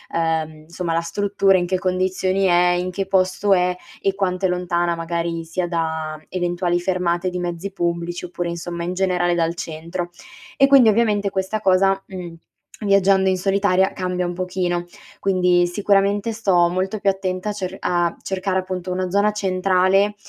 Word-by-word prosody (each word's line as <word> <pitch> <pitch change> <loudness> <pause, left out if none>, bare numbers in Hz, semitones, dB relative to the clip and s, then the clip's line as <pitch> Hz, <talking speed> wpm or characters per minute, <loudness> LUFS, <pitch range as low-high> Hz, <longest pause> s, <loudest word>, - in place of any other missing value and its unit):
ehm, 160 -2 -1
insomma 170 +1 -4
la 165 - +1
struttura 195 +2 +2
in 175 - 0
che 185 0 0
condizioni 185 +1 0
è, 175 0 +4
in 180 +1 -2
che 195 +1 -3
posto 190 +1 +1
è 180 0 +2 0.3
e 195 -1 0
quanto 190 -1 -1
è - - +3
lontana 175 -1 0
magari 165 0 -3
sia 175 +2 -3
da 160 -2 -2
eventuali 175 -1 -1
fermate 180 0 0
di 180 - -4
mezzi 175 +2 -4
pubblici 170 -1 -2
oppure, 175 0 -4
insomma, 170 0 -5
in 180 - -2
generale 180 -2 +1
dal 165 0 +1
centro; 170 +2 -5 0.4
e 275 - +5
quindi 270 -4 +7
ovviamente 210 -2 +2
questa 190 +2 -2
cosa, 195 0 +3
mhmm, 180 -3 -8 0.5
viaggiando 195 -1 +3
in 190 - +3
solitaria 195 0 +2
cambia 180 -1 -2
un 175 - -2
pochino, 180 -1 -2 0.3
quindi 180 -2 +2
sicuramente 200 +3 +1
sto 185 -6 +2
molto 190 +4 -2
più 200 - +2
attenta 190 +1 -2
a - - 0
cer 190 -2 -5
a 175 -1 0
cercare 190 0 -1
appunto 185 -1 -5
una 185 0 -2
zona 205 +2 +2
centrale 190 +1 +2
185 Hz, 165 wpm, -21 LUFS, 175-195 Hz, 0.5 s, quindi